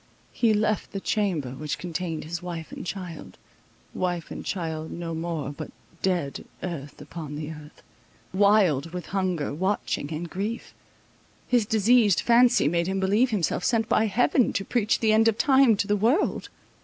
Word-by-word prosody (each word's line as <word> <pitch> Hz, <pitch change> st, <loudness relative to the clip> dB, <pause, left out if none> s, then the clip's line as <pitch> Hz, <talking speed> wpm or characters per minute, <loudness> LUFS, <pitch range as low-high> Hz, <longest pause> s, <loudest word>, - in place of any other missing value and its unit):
He 230 Hz, -2 st, +2 dB
left 215 Hz, 0 st, 0 dB
the 195 Hz, -, -2 dB
chamber 190 Hz, -, -1 dB
which 150 Hz, +3 st, -4 dB
contained 170 Hz, -2 st, -4 dB
his 170 Hz, +3 st, -5 dB
wife 170 Hz, -2 st, -6 dB
and -, -, -7 dB
child—wife 180 Hz, -1 st, -6 dB
and -, -, -6 dB
child 160 Hz, -4 st, -4 dB
no 170 Hz, -1 st, -5 dB
more, 160 Hz, -3 st, -3 dB
but 145 Hz, -, -7 dB, 0.3 s
"dead 175 Hz, -7 st, -1 dB, 0.2 s
earth 150 Hz, -6 st, -6 dB
upon 155 Hz, -4 st, -7 dB
the 150 Hz, +1 st, -5 dB
earth"—wild 165 Hz, +2 st, -1 dB
with 180 Hz, -1 st, -5 dB
hunger, 185 Hz, -7 st, -1 dB
watching 185 Hz, -3 st, -1 dB
and 165 Hz, +2 st, -4 dB
grief, 205 Hz, +7 st, -4 dB, 0.7 s
his 240 Hz, -4 st, +2 dB
diseased 220 Hz, -2 st, +4 dB
fancy 240 Hz, -, +5 dB
made 170 Hz, +2 st, +1 dB
him 190 Hz, 0 st, -1 dB
believe 205 Hz, +7 st, +3 dB
himself 185 Hz, -5 st, -1 dB
sent 225 Hz, -2 st, +1 dB
by 220 Hz, -, +3 dB
heaven 245 Hz, +4 st, +2 dB
to 195 Hz, -, -2 dB
preach 225 Hz, -3 st, +1 dB
the 220 Hz, -1 st, +4 dB
end 220 Hz, +1 st, +5 dB
of 225 Hz, -1 st, +2 dB
time 265 Hz, -5 st, +5 dB
to 200 Hz, -, 0 dB
the 205 Hz, 0 st, +1 dB
world. 230 Hz, -, +1 dB
185 Hz, 155 wpm, -26 LUFS, 165-215 Hz, 0.7 s, fancy